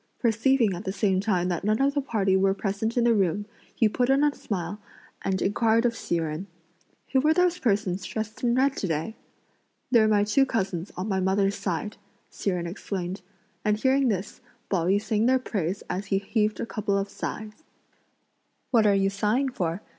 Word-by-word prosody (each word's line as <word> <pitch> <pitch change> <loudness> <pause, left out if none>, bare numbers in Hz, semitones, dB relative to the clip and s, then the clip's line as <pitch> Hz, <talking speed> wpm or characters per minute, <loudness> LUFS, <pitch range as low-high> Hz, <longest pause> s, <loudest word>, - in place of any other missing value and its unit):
Perceiving 235 -1 +2
at 175 +3 -6
the 190 - -2
same 195 -1 +1
time 190 -3 +1
that 175 0 -2
none 215 +2 +1
of 275 +1 +2
the 285 - 0
party 205 -8 +1
were 195 0 +3
present 205 +4 -2
in 240 - +4
the 235 0 +4
room, 200 -1 +1 0.3
he 225 - +4
put 245 +4 0
on 275 +2 +4
a 295 -1 +3
smile 190 -3 -4 0.4
and 190 -1 -1
inquired 225 +3 +2
of 235 -1 +1
Hsi 175 - -2
Jen: 160 +3 -3 0.6
"Who 265 - +4
were 305 +4 +3
those 360 0 +2
persons 200 -5 0
dressed 220 +3 -5
in 240 -1 +2
red 270 +1 +2
to 195 - -2
day?" 160 +7 -2 0.8
"They're 225 -3 +5
my 210 -1 +3
two 210 +6 +3
cousins 190 -6 -2
on 185 +3 -3
my 190 -3 0
mother's 195 +1 +2
side," 200 +2 -3 0.3
Hsi - - -2
Jen 180 -2 -1
explained, 185 +1 -4 0.4
and 210 0 +2
hearing 265 +3 +2
this, 200 +1 -3 0.3
Pao 175 -4 +1
yü 195 +2 +3
sang 215 +2 0
their 260 +1 +4
praise 195 -7 -3
as 195 +2 -4
he 195 - +1
heaved 210 +2 0
a - - -2
couple 205 -3 -1
of 195 0 -1
sighs. 215 +7 -6 1.1
"What 225 -4 +4
are 200 - +4
you 195 0 +2
sighing 215 +7 +1
for?" 180 -5 -3
210 Hz, 195 wpm, -26 LUFS, 190-230 Hz, 1.1 s, They're